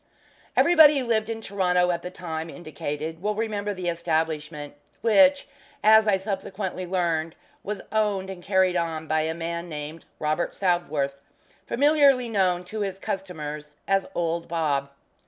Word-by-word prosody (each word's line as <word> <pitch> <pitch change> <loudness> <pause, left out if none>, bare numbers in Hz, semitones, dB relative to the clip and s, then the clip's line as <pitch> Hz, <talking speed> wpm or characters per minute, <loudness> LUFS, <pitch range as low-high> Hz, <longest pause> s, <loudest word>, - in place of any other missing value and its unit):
Everybody 315 -4 +7
who 260 - -1
lived 220 -2 0
in 225 0 -4
Toronto 180 -3 +1
at 170 -1 -2
the 180 - -6
time 165 -3 -5
indicated 155 0 -5
will 210 +2 -1
remember 210 -2 -2
the 185 -3 -4
establishment, 160 -3 -2 0.3
which, 280 +5 +5 0.4
as 220 0 +7
I 200 -2 +4
subsequently 190 -1 -4
learned, 170 -3 -1 0.3
was 205 0 -4
owned 205 -3 0
and 185 -2 -9
carried 190 -1 +2
on 165 -2 -1
by 155 0 +1
a 160 +1 -2
man 170 +1 -4
named 150 +1 -7
Robert 155 +3 -1
Southworth, 155 -7 0 0.5
familiarly 280 -3 +4
known 185 -4 +1
to 215 +4 -6
his 195 -2 -2
customers 150 -7 -5
as 195 0 +2
"Old 170 0 -1
Bob." 150 -5 0
180 Hz, 145 wpm, -25 LUFS, 160-205 Hz, 0.5 s, Everybody